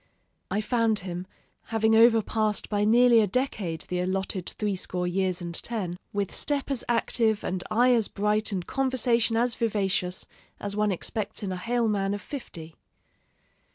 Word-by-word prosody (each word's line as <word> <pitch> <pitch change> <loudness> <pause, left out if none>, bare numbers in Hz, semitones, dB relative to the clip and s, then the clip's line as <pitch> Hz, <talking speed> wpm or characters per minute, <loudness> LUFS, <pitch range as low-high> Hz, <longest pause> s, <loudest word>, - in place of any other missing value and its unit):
I 210 - 0
found 225 -1 +1
him, 180 -1 -5 0.4
having 225 0 +2
overpassed 220 -2 +3
by 205 -1 +1
nearly 235 +1 +6
a 210 - +2
decade 200 -7 -2
the 180 0 -3
allotted 185 0 -2
threescore 185 -3 -1
years 185 0 0
and 170 0 -5
ten, 190 -2 -3 0.2
with 200 -2 -2
step 285 -1 0
as 265 - +1
active 225 -2 +1
and 180 -1 -2
eye 245 +3 +4
as 230 -3 +2
bright 210 +1 0
and 185 -3 -3
conversation 240 -4 +1
as 240 +1 +2
vivacious 190 -5 -1 0.3
as 205 0 -4
one 210 -1 +1
expects 210 +4 -3
in 195 - -2
a - - -2
hale 235 +5 0
man 200 -1 0
of 205 - -7
fifty.... 165 - -8
210 Hz, 155 wpm, -27 LUFS, 190-230 Hz, 0.4 s, nearly